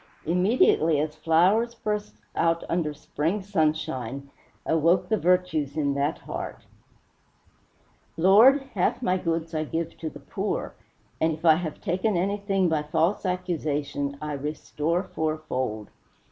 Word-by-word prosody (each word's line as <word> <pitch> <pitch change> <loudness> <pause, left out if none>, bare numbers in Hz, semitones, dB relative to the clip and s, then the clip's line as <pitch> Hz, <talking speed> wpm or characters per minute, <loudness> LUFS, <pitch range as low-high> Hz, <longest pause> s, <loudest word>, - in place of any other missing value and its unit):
Immediately, 170 - +3
as 150 +1 -1
flowers 180 +9 +3
burst 210 -2 -3 0.2
out 165 0 +1
under 170 -3 0
spring 160 +6 -2
sunshine, 140 - -1 0.3
awoke 165 +3 +2
the 220 - +3
virtues 170 -5 +1
in 140 -2 +1
that 140 +3 0
heart: - - -7 1.5
"Lord, 220 - +6
half - - 0
my 185 -4 +2
goods 165 -1 -2
I 155 -1 0
give 160 +2 -3
to 160 - -3
the - - -12
poor, - - -3 0.5
and 160 0 +2
if 155 +2 -8
I 160 -1 +7
have 160 -3 -5
taken 185 +2 0
anything 195 0 0
by 160 -2 +1
false 165 +7 0
accusation 150 -6 -2
I 150 -1 -4
restore 150 +4 -2
fourfold." 130 - -3
165 Hz, 130 wpm, -26 LUFS, 150-185 Hz, 1.5 s, I